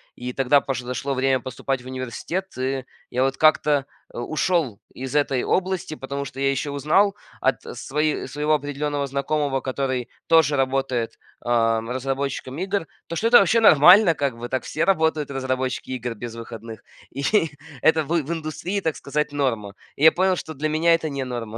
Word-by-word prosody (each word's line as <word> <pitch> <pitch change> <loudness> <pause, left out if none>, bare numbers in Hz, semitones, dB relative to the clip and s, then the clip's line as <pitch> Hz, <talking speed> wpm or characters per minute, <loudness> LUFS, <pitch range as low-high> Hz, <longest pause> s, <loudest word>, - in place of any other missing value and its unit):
и 125 0 -6
тогда 135 +2 +3
пош 130 -3 -3
подошло 125 +2 -3
время 130 0 +2
поступать 130 +1 -4
в - - -17
университет, 130 +9 -4
и 130 0 -2 0.3
я 125 +1 +1
вот 135 0 0
как-то, 150 -2 +3 0.3
э, - - -9
ушел 155 - 0 0.2
из 130 +2 -6
этой 140 -3 +1
области, 185 -3 -1
потому 140 0 -5
что 135 0 -9
я 135 0 +2
еще 140 +2 -2
узнал 165 +9 +2 0.3
от 135 - +1 0.2
свои 150 +4 -1
своего 150 +1 0
определенного 145 0 -2
знакомого, 140 0 -1
который 130 -2 -2 0.2
тоже 160 -3 +5
работает, 130 -3 -1 0.2
ам, 115 -1 +1
разработчиком 135 +1 -3
игр, 195 0 -2 0.2
то, 170 - -5
что 225 - +1
это 240 - +8
вообще 210 +4 +4
нормально 180 -1 +7
как 140 -5 -1
бы. 120 +1 -6
Так 130 - -1
все 155 - -2
работают 160 -4 +2
разработчики 130 -1 -2
игр 120 -2 -4
без 115 +1 -7
выходных, 115 -1 -9 0.3
и 140 - -5 0.6
это 160 0 +4
в - - -12
в 150 +3 -6
индустрии, 165 +5 -3
так 160 -4 -1
сказать, 150 +2 -2
норма. 115 -8 -1 0.2
И 140 - -4
я 160 - +9
понял, 185 +1 +2
что 160 - -6
для 155 +1 -2
меня 160 +2 +3
это 160 -1 -3
не 140 -2 -3
норма 115 -3 -5
140 Hz, 180 wpm, -23 LUFS, 130-155 Hz, 0.6 s, я